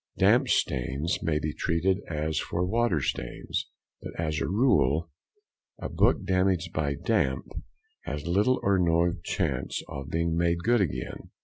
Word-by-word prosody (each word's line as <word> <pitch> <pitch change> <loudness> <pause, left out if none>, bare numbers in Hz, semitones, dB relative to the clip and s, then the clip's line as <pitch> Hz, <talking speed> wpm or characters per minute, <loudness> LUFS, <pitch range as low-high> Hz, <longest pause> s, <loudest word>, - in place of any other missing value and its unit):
Damp - - +4
stains 70 +7 0
may 80 -3 +1
be 75 0 -2
treated 90 +4 +1
as 80 0 -1
for 90 +2 -1
water 110 -5 +1
stains, - - -3 0.3
but, - - -8
as 75 -2 -1
a - - 0
rule, 85 - +2 0.7
a - - -5
book - - +2
damaged 90 -2 +1
by 70 -2 0
damp 65 -1 0 0.6
has 75 +1 -4
little 105 +9 +2
or 100 -1 +3
no 85 0 +3
chance - - -1
of 70 +1 -7
being 80 +1 0
made 85 0 +2
good 120 -1 +3
again. 65 -9 -3
85 Hz, 145 wpm, -27 LUFS, 75-95 Hz, 0.7 s, Damp